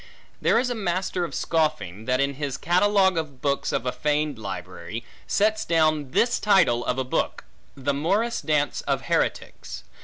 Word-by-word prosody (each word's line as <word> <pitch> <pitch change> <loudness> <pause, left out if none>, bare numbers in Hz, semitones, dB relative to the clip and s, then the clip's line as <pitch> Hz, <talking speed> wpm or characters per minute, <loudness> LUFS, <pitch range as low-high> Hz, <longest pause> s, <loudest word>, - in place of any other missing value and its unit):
There - - +3
is 250 +1 +1
a - - +1
master 185 -3 -1
of - - -7
scoffing, 115 - -1
that 130 +1 +1
in 140 0 +1
his 140 -1 -4
catalogue 190 +2 +3
of 145 -5 -6
books 140 +1 0
of 115 - -1
a 125 - 0
feigned 150 -3 -1
library, 95 +2 -6 0.2
sets 215 +1 +2
down 155 -5 +2
this 235 - +2
title 175 - +4
of 125 - -1
a 130 - 0
book, 130 - -2 0.3
The 140 +1 -1
Morris 200 +11 0
Dance 150 -2 0
of - - +1
Heretics. - - -2
150 Hz, 165 wpm, -25 LUFS, 130-190 Hz, 0.3 s, title